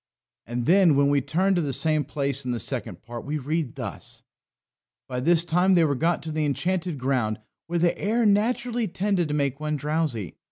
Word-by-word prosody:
And 120 +1 -3
then 175 -2 +5
when 140 0 +3
we 140 -1 +3
turn 190 +8 +1
to 175 - +1
the 145 -3 -2
same 150 +3 +2
place 140 -2 -1
in 125 - -5
the 120 -1 -1
Second - - -3
Part 120 0 -7
we 150 +2 -3
read 150 -1 -2
thus: - - -6 0.8
"By 125 -1 -3
this 165 +5 +3
time 180 +3 +3
they 170 - +5
were 150 -3 +2
got 165 +5 0
to 160 - -5
the 155 0 -1
Enchanted 170 +4 -1
Ground, 125 -5 -1 0.3
where 170 +1 -1
the 170 0 +2
air 225 +3 +1
naturally 235 +3 +1
tended 185 -1 0
to 150 - -2
make 140 -2 -1
one 150 0 -2
drowsy. 150 - -2
155 Hz, 200 wpm, -25 LUFS, 140-175 Hz, 0.8 s, then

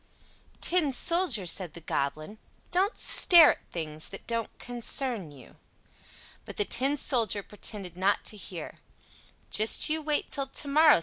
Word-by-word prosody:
"Tin 340 -5 +1
Soldier," 295 - 0
said 175 -2 +1
the - - -9
Goblin, 155 +5 -5 0.3
"don't 385 +5 0
stare 340 -5 +7
at - - -11
things 155 -2 -4
that 195 - -12
don't 230 -1 -4
concern 240 - -2
you." 135 -3 -17 0.9
But - - -12
the 205 - -1
Tin 275 +7 0
Soldier 230 -7 0
pretended 200 -3 -6
not 190 +3 -1
to - - -2
hear 185 -4 -8
him. - - -21 0.7
"Just 215 +7 +3
you 315 0 +1
wait 300 -1 -3
till 275 -2 -2
to 285 - -2
morrow!" 300 - +4
230 Hz, 150 wpm, -27 LUFS, 185-295 Hz, 0.9 s, stare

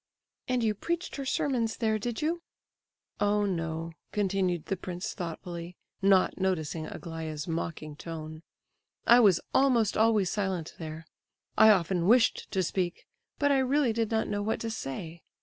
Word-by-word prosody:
"And 250 -2 +1
you 215 -1 +2
preached 340 - -3
her 275 -1 -4
sermons 240 -5 0
there, 220 -2 +1
did 240 +4 -3
you?" 335 +2 0 0.8
"Oh 205 0 +2
no," 165 -3 -2 0.2
continued 190 -4 0
the 195 - -1
prince 180 +1 -5
thoughtfully, 175 -1 -6 0.2
not 195 -1 +4
noticing 165 -4 -1
Aglaya's 160 -2 -6
mocking 160 -2 -4
tone, 155 0 -7 0.6
"I 240 - +8
was 200 -7 +6
almost 245 -6 +3
always 215 -4 +3
silent 190 -5 -2
there. 160 0 -7 0.5
I 220 - +8
often 180 -3 +3
wished 235 +2 +4
to 190 -2 0
speak, 175 0 -2 0.3
but 285 0 +2
I 275 - +4
really 265 -2 +2
did 225 -1 0
not 220 -1 0
know 205 0 -1
what 220 +2 -1
to 230 - -2
say. 165 -3 -6
195 Hz, 150 wpm, -29 LUFS, 170-225 Hz, 0.8 s, I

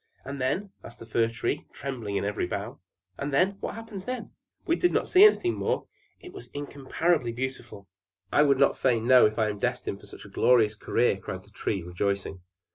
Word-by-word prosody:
"And 140 0 -5
then?" 190 +10 -1
asked 120 - -11
the - - -11
Fir 115 0 +1
Tree, 115 0 -3
trembling 120 -6 -5
in 100 - 0
every 105 -3 -1
bough. 105 +7 -5 0.4
"And 140 +1 -3
then? 185 +8 +2
What - - -4
happens 225 -4 -8
then?" 255 0 -5 0.3
"We 335 - +2
did 355 0 +2
not - - 0
see 375 +2 +7
anything 370 -4 +5
more: - - -1 0.3
it 360 - -12
was 395 - -9
incomparably 145 0 -1
beautiful." 120 -5 -6 0.4
"I - - +4
would 140 -2 +4 0.2
fain 115 -4 +1
know 125 -2 +7
if 105 - -6
I 110 -2 +2
am 105 -1 -5
destined 125 -5 -2
for 105 - -15
so - - -11
glorious 110 +2 +3
a 105 - -22
career," 120 -4 +1
cried 95 -1 -7
the 105 - -22
Tree, 100 -3 -2
rejoicing. 95 +1 -2
125 Hz, 200 wpm, -27 LUFS, 105-145 Hz, 0.4 s, see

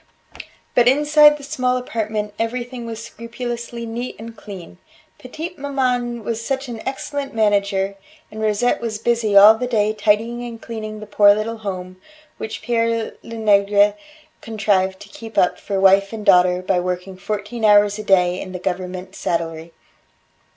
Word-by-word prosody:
But 240 0 +4
inside 295 +2 +5
the 290 - -13
small 255 -3 0
apartment 215 -4 -3
everything 240 +1 -4
was 225 0 -6
scrupulously 235 0 -6
neat 235 +2 -5
and 225 +1 -9
clean. 185 - -11 0.4
Petite 320 +7 -8
maman 250 -4 -1
was 230 +1 -3
such 270 +2 -3
an 230 -2 -7
excellent 275 0 -4
manager, 200 -2 +1 0.4
and 215 +1 -7
Rosette 215 +3 +1
was 225 -2 -3
busy 225 -2 +1
all 205 +2 +10
the 250 +3 -3
day 215 -3 +1
tidying 220 +3 0
and 235 -1 -7
cleaning 215 -2 -7
the - - -7
poor 205 0 +5
little 225 +2 -3
home, 185 -3 -6 0.4
which 220 - -6
Pere 230 0 0
Lenegre 205 -2 +3 0.5
contrived 200 -4 0
to 205 - -12
keep 225 +2 -11
up 180 - +2
for 195 -1 -3
wife 195 +1 +4
and 220 -2 -7
daughter 180 0 +4
by 185 -1 +1
working 180 +1 -4
fourteen 210 +4 -5
hours 205 0 +5
a - - -5
day 180 -2 +2
in 185 - -8
the - - -3
government 185 0 -4
saddlery. 165 -2 -3
215 Hz, 155 wpm, -20 LUFS, 200-235 Hz, 0.5 s, all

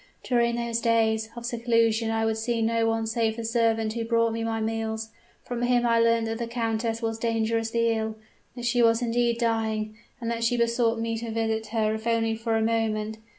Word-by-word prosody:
During 235 -1 +2
those 235 -1 -2
days 220 -1 +2
of 235 0 -7
seclusion 230 -1 +1
I 225 0 0
would 220 0 0
see 230 0 0
no 230 0 +1
one 225 0 0
save 225 0 0
the 230 - -4
servant 225 -1 +1
who 230 0 -2
brought 230 0 +2
me 230 0 -2
my 225 0 -1
meals. 220 0 -2 0.3
From 240 -1 -4
him 245 0 +2
I 230 -1 +3
learnt 230 0 +3
that 225 +1 -3
the 235 - -2
countess 230 -1 -2
was 225 0 -2
dangerously 230 0 0
ill 220 -1 -1 0.4
that 245 -1 -6
she 240 0 +2
was 230 +1 +4
indeed 235 0 +1
dying, 220 -2 -1 0.2
and 230 -1 -3
that 230 0 -2
she 240 +1 +2
besought 235 0 +2
me 230 0 -2
to 230 0 -5
visit 220 0 -1
her 215 -1 0
if 220 +1 -5
only 225 -1 +1
for 225 0 -1
a 220 - +1
moment. 220 -1 -1
230 Hz, 205 wpm, -26 LUFS, 225-235 Hz, 0.4 s, was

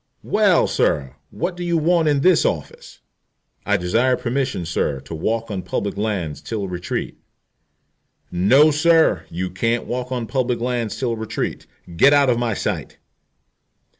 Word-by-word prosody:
"Well, - - +3
sir, 65 -3 0
what 175 - -3
do 175 - -6
you 170 -1 +1
want 165 0 +2
in 145 -2 +2
this 180 +3 +4
office?" - - -4 0.7
"I 105 0 +3
desire 115 +8 +1
permission, 125 -6 -2
sir, 75 -4 -1
to 75 - -10
walk 110 +7 -2
on 95 -2 -3
public 100 +2 -3
lands 100 -7 -3
till 105 -4 -4
retreat." 90 -1 -4 1.1
"No, 130 - +5
sir, 160 - +3
you 90 +2 -4
can't 115 +5 -1
walk 125 +1 -4
on 125 -2 -2
public 125 -1 -1
lands 120 -2 -2
till 120 -3 -1
retreat. 110 -1 -4 0.3
Get 140 +10 +6
out 140 -3 +4
of 120 - 0
my 115 -3 -1
sight." - - -4
115 Hz, 150 wpm, -21 LUFS, 95-140 Hz, 1.1 s, Get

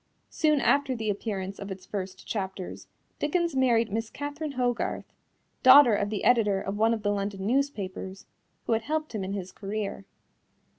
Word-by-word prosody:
Soon 305 -2 +2
after 280 -1 +2
the 220 -2 -1
appearance 195 -2 -4
of 200 - -6
its 190 -1 -7
first 190 -2 -6
chapters, 190 -3 -5 0.3
Dickens 335 +1 0
married 235 -4 +3
Miss 225 +1 -2
Catherine 290 +2 -5
Hogarth, 245 -2 -2 0.5
daughter 260 -2 +9
of 205 0 0
the 210 -1 -3
editor 210 -5 +4
of 195 +1 -4
one 225 +2 +3
of 215 - -8
the 205 - +2
London 200 -1 -3
newspapers, 200 -7 -2 0.4
who - - +1
had 225 - +1
helped 310 +3 -3
him 210 -3 -2
in 190 +1 -4
his 190 -2 -5
career. 200 -1 -4
220 Hz, 165 wpm, -27 LUFS, 195-260 Hz, 0.5 s, daughter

